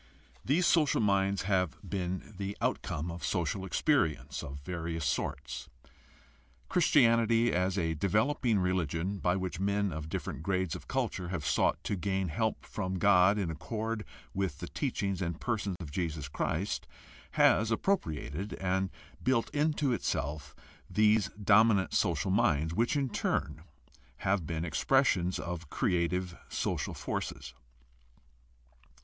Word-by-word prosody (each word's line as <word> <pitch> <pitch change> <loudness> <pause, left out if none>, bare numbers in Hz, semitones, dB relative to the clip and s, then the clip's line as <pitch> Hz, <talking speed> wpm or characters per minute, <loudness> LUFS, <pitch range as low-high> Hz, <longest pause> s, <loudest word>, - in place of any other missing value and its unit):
These 160 +7 +2
social 155 -6 +4
minds 100 -2 +2
have 95 -4 +1
been 95 +3 -3
the 100 +1 -4
outcome 80 +4 -1
of 85 +1 -8
social 90 +2 -1
experience 80 - +1
of 70 0 -6
various 85 0 -3
sorts. - - -3 1.0
Christianity, 115 -7 +4
as 90 +2 +1
a 80 -3 +1
developing 110 - +1
religion 90 0 0
by 90 0 +2
which 95 -2 -3
men 100 -1 +1
of 80 0 -5
different 75 - -4
grades 95 0 0
of - - -9
culture 90 - -2
have 85 -5 -3
sought - - +2
to 100 - -1
gain 95 -1 -1
help 110 +8 -1
from 95 -2 -3
God 95 +1 +5
in 95 -5 -1
accord 110 - -3 0.3
with 95 -7 -1
the - - -6
teaching 100 -2 -2
and 85 -2 -2
person 105 -5 -1
of 80 -5 -7
Jesus 80 -4 -2
Christ, 70 - -2 0.5
has 110 +1 +4
appropriated 100 - -1
and 95 0 0 0.3
built 125 -3 +1
into 150 -2 +1
itself 75 - -3 0.3
these 105 -2 +3
dominant 105 -1 +4
social 85 -2 +1
minds, 80 -4 +2
which 115 - +1
in 140 -2 +1
turn 75 - -1 0.6
have 95 -4 +1
been 80 0 -2
expressions 95 - +2
of 85 -3 -5
creative 90 +1 0
social - - -2
forces. - - -4
95 Hz, 130 wpm, -31 LUFS, 85-105 Hz, 1.0 s, God